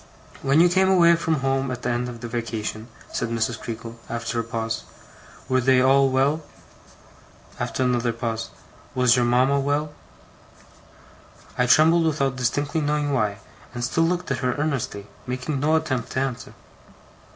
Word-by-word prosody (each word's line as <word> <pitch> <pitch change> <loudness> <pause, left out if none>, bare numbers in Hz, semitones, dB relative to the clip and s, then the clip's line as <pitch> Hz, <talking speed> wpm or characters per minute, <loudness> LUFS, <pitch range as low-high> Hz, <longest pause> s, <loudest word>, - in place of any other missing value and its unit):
'When 140 +3 +3
you 175 - +7
came 190 +2 +3
away 170 -3 +6
from 165 -3 -1
home 135 0 0
at 125 -1 -5
the 125 - 0
end 120 +1 -1
of 120 -1 -9
the 120 - -5
vacation,' 115 -1 -4 0.3
said - - -2
Mrs. 115 0 -1
Creakle, 115 0 -7
after 115 +1 -3
a - - 0
pause, 115 -1 -3 0.6
'were 130 -1 +2
they 130 +1 +4
all 135 +1 +4
well?' 135 +4 +1 1.2
After 130 - -1
another 120 -1 +1
pause, 115 -1 -4 0.5
'Was 125 -1 +4
your 125 -1 +2
mama 130 +4 +3
well?' 145 +2 -1 1.6
I 125 - +1
trembled 165 +5 +5
without 140 -4 0
distinctly 145 +5 0
knowing 145 -1 0
why, 105 -6 0 0.4
and 120 - -3
still 145 +7 +1
looked 180 -2 -1
at 135 - -1
her 125 -1 0
earnestly, 130 -9 -2 0.2
making 125 +3 -3
no 155 +3 +2
attempt 145 -6 -1
to - - 0
answer. 130 -3 -4
130 Hz, 160 wpm, -24 LUFS, 120-145 Hz, 1.6 s, you